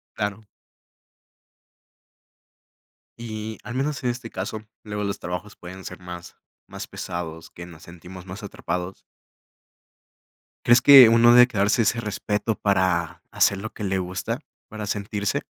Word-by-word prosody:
Claro. 105 0 -4 2.7
Y 110 -1 -6
al 120 - -7
menos 145 +3 -2
en 125 - +1
este 120 -1 -8
caso, 105 +3 -5 0.2
luego 105 -1 -4
los 100 0 -3
trabajos 90 +4 -6
pueden 95 +2 -10
ser - - -8
más 90 -1 -10 0.3
más - - -7
pesados 80 -2 -6
que 90 - -10
nos 85 -3 -14
sentimos 90 +2 -12
más 95 +3 -9
atrapados. 90 -1 -4 1.7
¿Crees 120 +1 +6
que 135 -4 +10
uno 115 +1 +6
debe 125 0 +8
quedarse 105 0 +1
ese 115 +2 +1
respeto 105 0 -2
para 95 -5 0
hacer 100 - +3
lo 105 +3 -6
que 105 - -7
le 95 -1 0
gusta? 95 +1 -3 0.3
¿Para 110 -1 -6
sentirse? 105 0 -2
100 Hz, 135 wpm, -24 LUFS, 90-110 Hz, 2.7 s, que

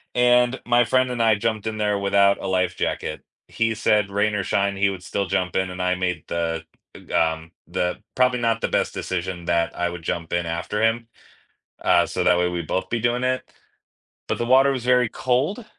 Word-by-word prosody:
And 125 +1 +3
my 120 0 +4
friend 130 +1 +2
and 120 -1 -2
I 110 -2 +4
jumped 110 +1 -2
in 110 0 -3
there 105 -1 0
without 100 0 +3
a - - -4
life 90 -1 0
jacket. 75 - -3 0.3
He 115 -1 -1
said, 105 -2 +2
"Rain 100 +1 +1
or 100 - -1
shine," 100 +1 0
he 100 0 +3
would 95 -2 -6
still 100 -2 -2
jump 95 -2 -1
in, 95 0 +1
and 90 0 -6
I 90 0 +1
made 90 -4 -2
the, 85 -1 -2 0.5
um, 80 0 0 0.2
the, 90 0 -2
probably 125 0 +2
not 115 -1 +1
the - - +1
best - - 0
decision 90 -1 -4
that 85 -1 0
I 90 0 0
would 90 0 -7
jump 85 0 -3
in 85 0 0
after 85 +6 -3
him, 115 +1 +1 0.8
uh, - - +4
so - - -2
that 90 0 +4
way 90 - +2
we'd 85 -2 -4
both 95 - -2
be 115 - 0
doing 120 +2 0
it, 130 0 0 0.9
but - - -1
the 120 - -1
water 135 +2 +5
was 130 -3 -3
very 125 -2 +3
cold, 130 - -1
100 Hz, 210 wpm, -23 LUFS, 90-120 Hz, 0.9 s, water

